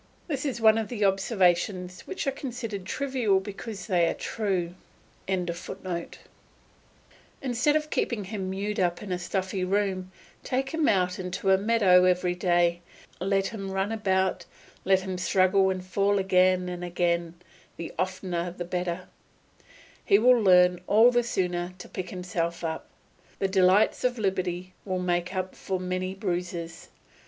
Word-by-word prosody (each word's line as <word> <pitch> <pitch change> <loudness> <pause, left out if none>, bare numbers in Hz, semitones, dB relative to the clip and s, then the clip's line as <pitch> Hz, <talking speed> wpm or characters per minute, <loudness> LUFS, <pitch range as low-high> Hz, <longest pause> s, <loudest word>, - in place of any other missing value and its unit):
This 290 -4 -3
is 265 -4 -2
one 220 0 +5
of 220 - -3
the 215 -4 -1
observations 185 -2 +1
which 380 - -4
are 275 - +1
considered 240 -8 -5
trivial 260 -7 +1
because 200 0 -7
they 175 -5 +2
are - - -1
true.] 190 -6 -2 0.5
Instead 180 -1 -4 1.6
of 305 0 0
keeping 225 -4 -1
him 190 -1 -4
mewed 200 +2 -3
up 175 0 0
in 200 - -6
a 180 - -1
stuffy 185 +1 -2
room, 185 -1 -1 0.3
take 265 +1 -1
him 320 -2 +1
out 180 -2 +1
into 185 +1 -1
a 190 - +6
meadow 195 -4 +5
every 180 0 +2
day; 175 -1 +2 0.4
let 195 +2 +1
him 195 -4 -6
run 195 +2 -1
about, 190 -4 0 0.4
let 190 0 +4
him 185 -1 -4
struggle 190 +1 +3
and 185 -1 -3
fall 200 +2 +1
again 185 -1 +3
and 180 0 -5
again, 175 -1 -1 0.4
the 170 - -6
oftener 185 -2 -2
the 175 0 -6
better; 180 0 -3 1.0
he 200 - +5
will 245 +3 +5
learn 180 -2 +5
all 225 +4 +6
the 240 0 +3
sooner 180 -5 -2
to - - -10
pick 185 -1 -6
himself 175 -2 -3
up. 160 -1 -4 0.5
The 195 - 0
delights 190 +2 +3
of 250 -1 +1
liberty 185 -3 -2
will 185 -2 -2
make 180 0 -1
up 185 0 -2
for 190 -1 -3
many 185 +1 -3
bruises. 175 -3 -4
185 Hz, 150 wpm, -27 LUFS, 180-205 Hz, 1.6 s, a